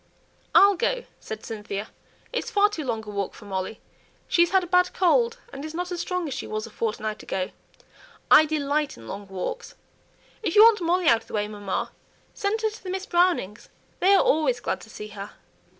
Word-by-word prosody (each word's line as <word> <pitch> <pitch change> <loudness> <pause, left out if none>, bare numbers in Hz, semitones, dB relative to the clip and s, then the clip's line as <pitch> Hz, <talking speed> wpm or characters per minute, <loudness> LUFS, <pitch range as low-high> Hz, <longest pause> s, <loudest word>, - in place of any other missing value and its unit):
"I'll 400 +1 +8
go," - - -1 0.2
said 220 0 -7
Cynthia. 210 -1 -5 0.4
"It's 485 - -2
far 410 0 +4
too 345 -7 -5
long 225 -4 -3
a - - -5
walk 200 -2 -3
for - - -13
Molly; 190 +2 -4 0.5
she's 345 -1 +4
had 380 -1 +3
a - - -3
bad 360 +1 +2
cold, 465 +6 +3 0.2
and 275 - -7
isn't 345 +4 -4
as 350 -1 -2
strong 360 -2 -2
as 280 - -4
she 260 - -5
was 215 +1 -3
a 230 - -11
fortnight 215 -1 -3
ago. 185 -1 -3 0.8
I 310 - +9
delight 300 -1 -1
in 115 - -12
long 200 - -7
walks. 195 - -5 0.7
If 380 -7 -2
you 420 - +10
want 450 -3 +6
Molly 350 +2 +1
out 230 -5 +5
of - - -21
the - - -13
way, 210 0 0
mamma, 205 -2 -3 0.4
send 425 +2 -1
her 435 - +2
to 440 - -13
the 370 - -6
Miss 380 +1 -3
Brownings' 345 - +1 0.3
they 390 +2 +5
are - - +5
always 320 +11 +2
glad - - -3
to - - -13
see 210 - -8
her." 205 0 -8
310 Hz, 205 wpm, -25 LUFS, -, 0.8 s, you